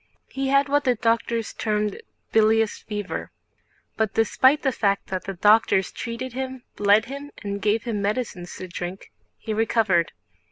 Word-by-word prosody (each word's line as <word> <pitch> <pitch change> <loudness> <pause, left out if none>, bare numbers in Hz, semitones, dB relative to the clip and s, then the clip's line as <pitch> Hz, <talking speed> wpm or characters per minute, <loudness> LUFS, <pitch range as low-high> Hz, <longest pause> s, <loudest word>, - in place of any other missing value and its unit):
He 270 0 -2
had 275 +1 +3
what 290 +1 +2
the 250 -2 +2
doctors 230 0 0
termed 210 -2 -1 0.3
"bilious 220 0 +3
fever." 205 -2 -5 0.7
But 220 -3 0
despite 260 +6 +3
the 270 - +2
fact 200 -4 0
that 185 -1 -3
the 195 - -5
doctors 205 -1 +4
treated 235 +1 -5
him, 260 -1 -5
bled 205 +2 +4
him, 280 +2 -7
and 200 0 -4
gave 215 +2 +1
him 225 -4 -2
medicines 205 -4 -3
to 185 - -7
drink, 180 +1 -6 0.3
he 220 - -4
recovered. 215 -6 +2
220 Hz, 155 wpm, -24 LUFS, 200-250 Hz, 0.7 s, doctors